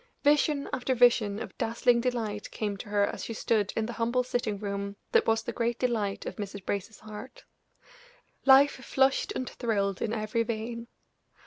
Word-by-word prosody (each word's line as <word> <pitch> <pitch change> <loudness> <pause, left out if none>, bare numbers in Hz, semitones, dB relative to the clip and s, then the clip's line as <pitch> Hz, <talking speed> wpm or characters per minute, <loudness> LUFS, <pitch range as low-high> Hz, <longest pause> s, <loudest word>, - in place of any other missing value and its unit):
Vision 290 0 +3
after 260 +1 0
vision 230 -4 +4
of - - -7
dazzling 235 +1 +2
delight 225 -4 -2
came 210 -2 -3
to 205 - -9
her 205 -1 +3
as - - -5
she 230 - -5
stood 215 -2 +1
in 220 - 0
the 235 - -5
humble 235 +2 +1
sitting 240 -4 -2
room 200 0 -4 0.2
that - - +4
was 225 0 +2
the - - -4
great 235 0 -1
delight 225 -6 -1
of - - -5
Mrs. 200 -2 -6
Brace's 200 +2 -4
heart; 215 +4 -10 1.0
life 275 +1 +7
flushed 265 0 +2
and 255 - -3
thrilled 200 -5 -1
in 220 - -1
every 215 0 -1
vein. 230 +1 -4
225 Hz, 175 wpm, -29 LUFS, 205-245 Hz, 1.0 s, life